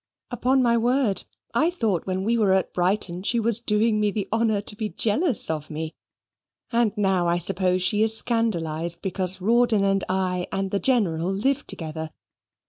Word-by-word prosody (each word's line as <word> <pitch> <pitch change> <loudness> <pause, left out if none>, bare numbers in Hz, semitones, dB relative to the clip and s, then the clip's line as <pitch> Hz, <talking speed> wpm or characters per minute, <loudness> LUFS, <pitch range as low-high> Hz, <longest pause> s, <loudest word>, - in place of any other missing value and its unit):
"Upon 255 +2 +2
my 235 -1 +3
word, 240 -4 +1 0.3
I 305 +8 +3
thought 225 - -1
when 185 0 -2
we 230 +3 +1
were 210 -4 +3
at 190 - 0
Brighton 180 -1 0
she 235 +4 0
was 230 0 +3
doing 215 -1 +1
me 210 0 +2
the 205 -1 -3
honour 225 -2 +1
to 205 +1 -6
be 215 0 -3
jealous 235 - 0
of 155 -1 -4
me; 155 +1 -5 0.8
and 235 -2 +2
now 190 -4 +1
I 170 0 +2
suppose 180 +1 0
she 205 +3 +1
is 220 0 +3
scandalised 170 -9 -1
because 190 -1 -2
Rawdon, 230 0 +3
and 195 0 +1
I, 185 -1 -1
and 195 0 -2
the 200 - 0
General 190 -10 +1
live 255 +8 -1
together. 160 -1 -4
200 Hz, 175 wpm, -24 LUFS, 180-230 Hz, 0.8 s, my